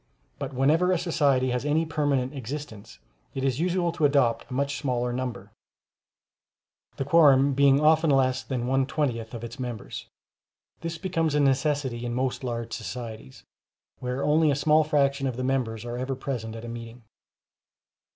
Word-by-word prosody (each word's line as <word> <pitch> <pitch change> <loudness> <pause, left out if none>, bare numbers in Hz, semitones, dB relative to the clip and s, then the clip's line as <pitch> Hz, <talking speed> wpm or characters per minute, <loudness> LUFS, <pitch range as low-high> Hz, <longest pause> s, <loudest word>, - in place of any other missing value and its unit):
But - - -4
whenever 155 +8 +2
a 185 - +3
society 145 -7 +1
has 125 +1 -1
any 150 +3 +1
permanent 145 -4 0
existence, 130 -5 -7 0.4
it 135 - -3
is 135 -1 0
usual 175 0 +1
to 165 -1 -4
adopt 140 -5 +2
a - - -6
much 140 +1 -1
smaller 125 -3 -1
number, 120 -5 -5 1.4
the 135 - -3
quorum 140 -4 +5
being 140 0 +5
often 155 +1 +4
less 130 -2 +2
than 120 +2 -3
one 135 +1 +1
twentieth 125 -7 -2
of 115 - -7
its 115 +2 -8
members; 120 -4 -6 0.7
this 165 0 -4
becomes 165 -3 -1
a - - +3
necessity 135 -3 +1
in 120 0 -3
most 130 +1 -1
large 115 -2 -4
societies, 110 - -7 0.6
where 125 +2 -3
only 155 +1 +3
a 140 - +2
small 150 +3 +4
fraction 140 -2 +1
of 125 -2 -3
the 130 - -2
members 120 -4 -1
are 120 0 -4
ever 130 +1 -2
present 120 -4 -5
at 115 +1 -8
a - - -7
meeting. 115 0 -8
135 Hz, 165 wpm, -26 LUFS, 120-150 Hz, 1.4 s, quorum